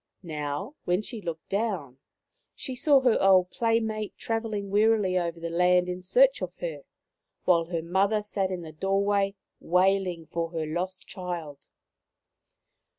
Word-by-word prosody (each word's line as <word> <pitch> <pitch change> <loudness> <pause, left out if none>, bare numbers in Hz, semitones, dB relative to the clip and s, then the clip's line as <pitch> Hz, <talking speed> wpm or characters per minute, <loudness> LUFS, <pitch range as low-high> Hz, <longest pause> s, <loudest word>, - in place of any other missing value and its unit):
Now, 155 - -4
when 180 +4 +1
she 225 -1 -6
looked 165 -3 -6
down, 190 - -2 0.6
she 265 - -5
saw 275 +2 +4
her 250 -3 +3
old 185 -2 +5
playmate 220 -2 -1
travelling 220 -3 -3
wearily 210 -2 +3
over 170 -2 -1
the 170 0 -4
land 180 +1 +3
in 180 0 -4
search 255 +9 +4
of 180 -1 -4
her, 155 -5 -6 0.6
while 170 -2 +4
her 165 -1 -3
mother 195 +5 +1
sat 195 -2 -1
in 180 -2 -4
the 160 - -8
door 195 +5 0
way 200 -1 +1 0.2
wailing 180 -1 +1
for 165 +1 -3
her 160 -1 -2
lost 180 +4 -4
child. 170 -6 -6
185 Hz, 150 wpm, -27 LUFS, 170-210 Hz, 0.6 s, old